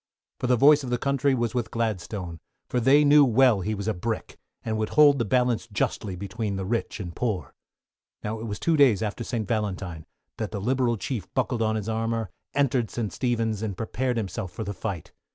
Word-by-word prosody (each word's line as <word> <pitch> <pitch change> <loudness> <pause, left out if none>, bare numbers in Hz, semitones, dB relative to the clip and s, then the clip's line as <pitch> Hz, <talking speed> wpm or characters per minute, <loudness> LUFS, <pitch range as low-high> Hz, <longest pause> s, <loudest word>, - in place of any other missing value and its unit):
For - - -1
the 125 - +4
voice 145 +4 +6
of 130 - -5
the 120 - +1
Country 140 +1 +1
was 120 -2 -1
with 120 -2 -1
Gladstone, 100 -6 -3 0.3
for 125 - 0
they 135 +5 +5
knew 145 0 +7
well 125 -4 +4
he 110 +4 -2
was 100 +1 -5
a 110 - +1
Brick, 110 +5 -4 0.3
and 110 -1 -1
would 110 - -1
hold 145 -2 +7
the 115 - +1
balance 125 0 +1
justly 100 -1 -1
between 100 +2 -4
the 95 -1 -3
rich 115 +3 -2
and 90 -4 -6
poor. 110 -7 -2 0.7
Now 110 +1 -3
it 115 - -5
was 105 -2 -4
two 165 - +2
days 130 -9 +5
after 110 +2 -3
St. 110 -3 -3
Valentine, 95 -7 -3 0.3
that 110 - -3
the 105 - -4
Liberal 120 +2 +1
Chief 110 -2 -4
buckled 125 -2 0
on 110 0 +1
his 105 -1 -3
armour, 115 -2 -1 0.2
entered 130 -5 +2
St. 110 +1 -3
Stephen's, 115 -4 -1
and 105 -4 -3
prepared 125 +2 -2
himself 95 -4 -3
for 90 - -5
the 100 - -4
fight. 95 -5 -5
115 Hz, 205 wpm, -26 LUFS, 105-125 Hz, 0.7 s, knew